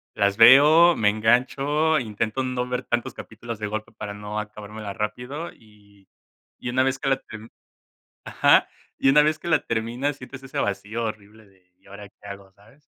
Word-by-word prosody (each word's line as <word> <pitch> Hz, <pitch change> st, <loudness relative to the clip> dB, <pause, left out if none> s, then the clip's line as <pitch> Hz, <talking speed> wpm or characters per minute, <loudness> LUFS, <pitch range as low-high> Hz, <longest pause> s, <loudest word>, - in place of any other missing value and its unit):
las 100 Hz, 0 st, +1 dB
veo, 150 Hz, +9 st, +7 dB
me 105 Hz, -2 st, +2 dB
engancho, 135 Hz, +8 st, +1 dB
intento 110 Hz, +2 st, -3 dB
no 125 Hz, -1 st, -3 dB
ver 125 Hz, 0 st, -3 dB
tantos 120 Hz, -1 st, -2 dB
capítulos 115 Hz, 0 st, -9 dB
de 105 Hz, -, -3 dB
golpe 110 Hz, +1 st, -5 dB
para 105 Hz, -1 st, -7 dB
no 105 Hz, +1 st, -6 dB
acabármela 105 Hz, 0 st, -8 dB
rápido, 125 Hz, +10 st, -5 dB
y 100 Hz, -2 st, -23 dB, 0.5 s
y -, -, -6 dB
una 130 Hz, +1 st, +2 dB
vez 135 Hz, 0 st, -1 dB
que 140 Hz, -, -2 dB
la 135 Hz, -, +3 dB
ter 110 Hz, -4 st, -12 dB, 0.7 s
ajá. -, -, +3 dB, 0.3 s
Y -, -, +2 dB
una 150 Hz, +2 st, +6 dB
vez 155 Hz, +1 st, +1 dB
que 175 Hz, -, -7 dB
la 160 Hz, -, +4 dB
terminas, 120 Hz, +5 st, -2 dB
sientes 130 Hz, 0 st, -11 dB
ese 135 Hz, -, -7 dB
vacío 105 Hz, +3 st, -3 dB
horrible 110 Hz, 0 st, -8 dB
de, 95 Hz, -2 st, -29 dB
¿y -, -, -29 dB
ahora 100 Hz, +1 st, -11 dB
qué 100 Hz, -, -19 dB
hago? 100 Hz, -1 st, -10 dB
¿Sabes? 105 Hz, +9 st, -23 dB
110 Hz, 180 wpm, -23 LUFS, 105-135 Hz, 0.7 s, veo